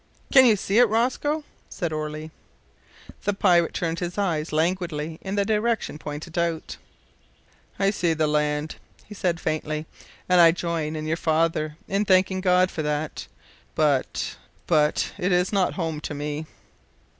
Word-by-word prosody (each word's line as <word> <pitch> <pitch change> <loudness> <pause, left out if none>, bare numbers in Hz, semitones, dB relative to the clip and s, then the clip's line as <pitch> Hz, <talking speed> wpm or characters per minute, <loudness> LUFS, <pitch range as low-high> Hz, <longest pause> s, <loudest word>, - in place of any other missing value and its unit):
"Can 265 -2 +8
you 220 - +5
see 200 +2 +1
it, 245 -2 +6
Rosco?" 260 +7 0 0.3
said 170 -5 -3
Orley. 155 +1 -4 0.9
The 205 - 0
pirate 175 -4 +3
turned 165 -1 -1
his 175 +1 -4
eyes 170 -6 -1
languidly 160 -1 -1
in 195 +1 -4
the 200 -1 +1
direction 220 -6 0
pointed 155 +3 -5
out. 170 -2 -2 1.0
"I 195 0 +2
see 175 -5 0
the 155 0 +1
land," 150 0 0 0.3
he 210 - -10
said 180 -4 -1
faintly, 155 -1 -2 0.4
"and 180 -1 +5
I 165 -1 +7
join 165 -3 -2
your 160 +1 -1
father 155 -2 0
in 200 +2 0
thanking 185 0 +3
God 185 0 +3
for 155 - -3
that 150 0 -3 0.5
but 145 -4 0 0.3
but 150 -3 +2
it 180 +2 0
is 180 +3 +2
not 190 -3 +2
home 165 -4 -2
to 150 - -5
me." 150 +2 -4
170 Hz, 150 wpm, -24 LUFS, 155-190 Hz, 1.0 s, Can